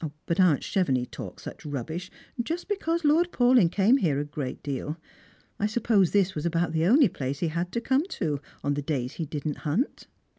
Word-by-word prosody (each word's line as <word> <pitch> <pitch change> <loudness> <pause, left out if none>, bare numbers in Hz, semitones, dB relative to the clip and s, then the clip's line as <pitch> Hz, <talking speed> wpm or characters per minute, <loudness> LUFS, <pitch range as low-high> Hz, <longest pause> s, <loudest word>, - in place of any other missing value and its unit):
But 170 - -1
aunt 175 -7 +4
Chevenix 135 -10 +1
talked - - -8
euch - - -8
rubbish, 155 +6 -4 0.3
just 330 +8 -4
because 340 -5 -1
Lord 335 +4 +4
Paulyn 245 -8 +4
came 210 +7 +4
here 160 - +1
a 145 - -2
good 145 -3 -5
deal. 145 +2 -3 0.6
I 210 - +2
suppose 215 -4 +2
this 195 -2 +2
was 150 - -4
about 170 -1 0
the 160 +1 +1
only 265 +5 +6
place 140 -5 -4
he 165 +2 -1
had 170 +3 -2
to 235 - -1
come 270 +6 +2
to, 145 -3 -1 0.2
on 145 - +1
the 145 - -2
days 135 -4 -2
he 165 - -4
didn't 150 0 -3
hunt." 180 - -2
170 Hz, 195 wpm, -27 LUFS, 145-235 Hz, 0.6 s, only